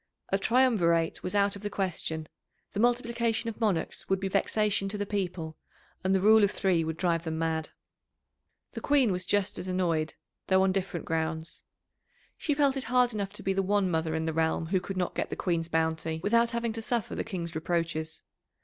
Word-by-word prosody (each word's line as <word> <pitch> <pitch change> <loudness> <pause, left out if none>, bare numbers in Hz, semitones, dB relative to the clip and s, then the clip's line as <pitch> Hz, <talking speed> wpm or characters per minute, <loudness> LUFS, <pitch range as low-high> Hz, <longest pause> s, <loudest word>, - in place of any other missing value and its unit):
A 195 - +1
triumvirate 195 -9 +3
was 185 - -3
out 200 0 +3
of 200 - -9
the 205 - -3
question; 165 -5 -2 0.5
the 205 - -3
multiplication 235 -1 +1
of 225 - -15
monarchs 200 -7 -1
would 190 0 +2
be 195 0 -2
vexation 200 0 +1
to 210 - -3
the 205 - -2
people, 180 -6 -3 0.4
and 190 +1 +2
the - - +3
rule 215 +2 +6
of 200 - +5
three 185 -4 +1
would 160 0 -3
drive 170 -2 +1
them 160 -1 -3
mad. 160 -1 -1 1.0
The - - -6
Queen 275 -6 +3
was 180 0 -2
just 205 -2 +1
as 185 - -5
annoyed, 170 -4 0 0.3
though 190 0 +4
on 190 - +3
different 185 -3 -2
grounds. 160 0 -2 0.7
She 295 - -1
felt 280 -2 +3
it 265 - -2
hard 245 0 +3
enough 200 -2 -3
to - - -8
be 195 - +1
the 195 - +1
one 195 -1 +1
mother 160 -1 0
in 160 0 -1
the 160 - -1
realm 160 0 +1
who 185 +3 +1
could 190 +1 -6
not 180 -1 -1
get - - -2
the - - -3
Queen's 170 -3 -1
bounty, 160 -1 -1
without 235 +2 +3
having 235 -1 -1
to 225 - -4
suffer 235 0 -1
the - - -2
King's 175 -6 -5
reproaches. 160 -1 -2
190 Hz, 205 wpm, -29 LUFS, 165-215 Hz, 1.0 s, rule